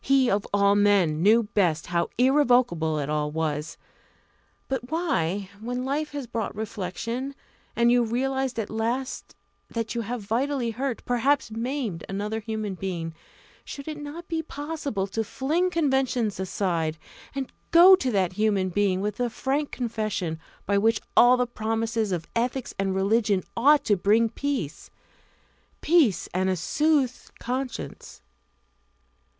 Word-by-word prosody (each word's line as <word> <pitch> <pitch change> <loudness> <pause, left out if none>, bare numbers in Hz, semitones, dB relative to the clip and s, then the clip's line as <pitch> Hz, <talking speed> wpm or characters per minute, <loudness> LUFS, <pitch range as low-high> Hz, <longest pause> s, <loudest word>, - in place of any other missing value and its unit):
He 270 -2 +3
of 200 +1 0
all 200 0 +4
men 200 -7 +3
knew 220 +5 +5
best 185 -7 +1
how 170 0 0
irrevocable 245 - +3
it 145 -2 -2
all 150 0 0
was. 155 0 -3 0.9
But 255 -2 -3
why, 200 - -1
when 245 +3 -3
life 295 +2 -2
has 285 -3 -4
brought 230 -3 -4
reflection, 225 +6 -4 0.4
and 235 0 +4
you 245 0 +4
realise 265 +2 -1
at 220 -3 -3
last 235 +4 -3 0.3
that 230 -1 -3
you 235 - -1
have 230 0 -4
vitally 240 +3 0
hurt, 255 +1 -3
perhaps 250 +1 +1
maimed, 230 - -3
another 205 +3 -2
human 215 -2 -4
being, 175 -3 -4 0.5
should 280 +1 -8
it 305 -1 -5
not 300 +4 -8
be 325 -1 -1
possible 290 -9 -4
to 225 +3 -2
fling 310 - 0
conventions 265 - 0
aside, 170 -4 -1 0.4
and 270 -2 -3 0.2
go 360 +3 +9
to 265 -8 -2
that 190 -6 +1
human 200 -2 +1
being 190 0 +1
with 210 0 -2
the 245 -1 0
frank 275 +5 -1
confession 215 -9 -3 0.3
which 205 +3 +3
by - - -31
all 245 +1 +7
the 250 - +2
promises 225 -2 -1
of 170 -2 -2
ethics 245 +2 -1
and 195 -1 0
religion 200 -1 +2
ought 285 +5 +5
to 210 - +3
bring 215 +5 +3
peace 260 - -3 0.9
peace 305 - +3
and 185 +1 +1
a 185 - +1
soothed 275 - 0
conscience? 255 +1 -5
225 Hz, 145 wpm, -26 LUFS, 195-265 Hz, 0.9 s, go